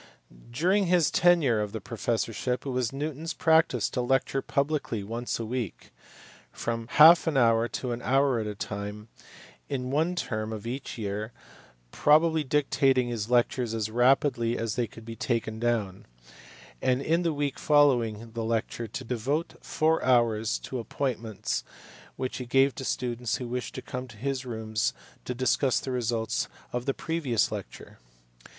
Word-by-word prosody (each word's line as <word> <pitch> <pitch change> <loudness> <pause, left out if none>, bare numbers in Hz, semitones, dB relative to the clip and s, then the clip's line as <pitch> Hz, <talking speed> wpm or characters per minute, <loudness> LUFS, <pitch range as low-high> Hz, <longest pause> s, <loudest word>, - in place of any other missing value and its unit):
During 180 +10 +2
his 175 -3 +3
tenure 160 -11 +4
of 105 0 -4
the 110 - -3
professorship, 115 +3 -2
it - - -3
was 125 -3 0
Newton 145 +1 -4
s 165 +1 -3
practice 160 - +3
to 125 - -1
lecture 135 +2 +1
publicly 140 -8 -1
once 115 +4 -3
a 115 - -3
week, 120 -3 -5 0.6
for - - -17
from 115 -1 -2
half 165 +3 +8
an 155 -4 +1
hour 115 -2 +4
to 125 +1 -4
an 120 +1 -4
hour 135 -1 +2
at 110 - -3
a 105 - -4
time, 105 +1 -6 0.6
in 130 -2 -3
one 160 +5 +1
term 110 -9 -3
of 110 -1 -6
each 130 +3 -5
year, 105 +1 -4 0.6
probably 160 +1 +4
dictating 135 -3 +2
his 115 -2 -3
lectures 120 -1 +1
as 110 -1 -2
rapidly 120 -1 +2
as 115 -2 -2
they 120 -2 0
could 115 +1 -13
be 115 0 -7
taken 110 -2 -2
down; 110 -5 -1 0.7
and 130 +1 +1
in 165 +4 +2
the 170 -2 +1
week 145 -2 -2
following 120 -7 +3
the 115 0 -4
lecture 115 +1 -2
to 105 - -6
devote 130 +7 -2
four 160 +1 +1
hours 115 -3 +2
to 130 - -6
appointments 115 -3 -3 0.5
which 130 -1 -3
he 125 - -6
gave 135 +2 +4
to - - -7
students 120 -3 -2
who 125 - -5
wished 125 +1 -4
to - - -6
come 125 0 -5
to 110 -3 -14
his 130 +2 -3
rooms 110 -2 -2 0.3
to 125 - -3
discuss 130 +1 +2
the 130 - -5
results 115 -3 -1 0.3
of 125 +1 -3
the 135 - +2
previous 155 -9 0
lecture. - - -8
125 Hz, 165 wpm, -28 LUFS, 115-140 Hz, 0.7 s, half